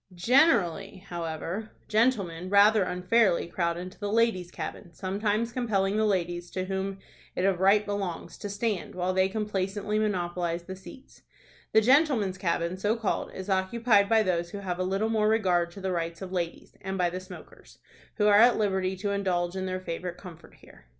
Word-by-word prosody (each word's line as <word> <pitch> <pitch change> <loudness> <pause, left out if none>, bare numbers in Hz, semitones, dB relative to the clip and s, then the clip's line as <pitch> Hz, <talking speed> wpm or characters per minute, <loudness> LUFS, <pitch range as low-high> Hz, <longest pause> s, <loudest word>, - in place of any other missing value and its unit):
Generally, 205 - +2
however, 170 +5 -5
gentlemen 200 -7 +1
rather 205 +2 +6
unfairly 180 +2 +2
crowd 170 -1 -1
into 185 +1 -8
the 205 -1 -3
ladies' 220 -6 +1
cabin, 175 0 -7
sometimes 205 +5 -1
compelling 205 -5 0
the 215 0 +2
ladies, 175 -3 -1
to 185 0 -3
whom 195 0 -3 0.4
it 180 - 0
of 195 -3 +2
right 200 +2 +4
belongs, 200 -4 -4
to 205 - -5
stand, 200 -3 -2
while 180 +1 -1
they 190 0 +2
complacently 210 0 -2
monopolize 175 -4 -1
the 190 +2 -7
seats. 225 +8 -14 0.5
The 220 - +5
gentlemen's 240 - +3
cabin, 170 0 -1
so 205 +4 +1
called, 225 -4 -2
is 190 - -6
occupied 200 +2 +2
by 225 -1 +4
those 175 -3 -1
who 205 - -7
have 185 -3 -4
a - - +1
little 195 +4 0
more 215 -1 +2
regard 185 -6 +2
to 195 - -10
the 190 0 -2
rights 170 +1 -3
of 185 - -7
ladies, 175 -2 -4
and 190 0 -4
by 175 -2 +1
the 185 - -4
smokers, 185 -1 -13 0.4
who 210 - +1
are 205 0 +6
at 240 +2 +6
liberty 190 -3 0
to 200 +2 -2
indulge 180 -3 -1
in 190 0 -3
their 185 0 -2
favorite 180 0 -5
comfort 170 -3 -13
here. - - -19
190 Hz, 180 wpm, -28 LUFS, 180-210 Hz, 0.5 s, rather